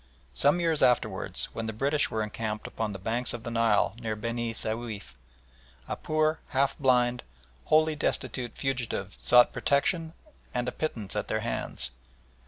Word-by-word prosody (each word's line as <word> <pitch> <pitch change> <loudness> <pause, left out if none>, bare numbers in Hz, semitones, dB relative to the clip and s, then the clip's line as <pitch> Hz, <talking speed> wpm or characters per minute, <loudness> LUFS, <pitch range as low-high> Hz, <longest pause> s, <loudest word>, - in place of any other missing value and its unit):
Some 145 +5 +3
years 165 -3 +1
afterwards, 110 -5 +1
when 115 0 -3
the 110 - -3
British 140 +6 +1
were 110 -1 -1
encamped 105 0 -4
upon 110 -2 -3
the 100 - -5
banks 115 +6 0
of 115 - -8
the 120 - -4
Nile 115 -2 +3
near 110 -2 -2
Beni 115 +1 -2
Souif, 110 -8 -4 0.7
a - - -2
poor, 155 0 +1
half 135 0 +1
blind, 125 -3 +3 0.4
wholly 155 0 +4
destitute 125 -4 -2
fugitive 120 -7 -2
sought 125 0 +6
protection 160 +3 +1 0.4
and 125 0 0
a - - 0
pittance 115 -11 -3
at - - -1
their - - -1
hands. 60 0 -2
120 Hz, 155 wpm, -28 LUFS, 110-140 Hz, 0.7 s, sought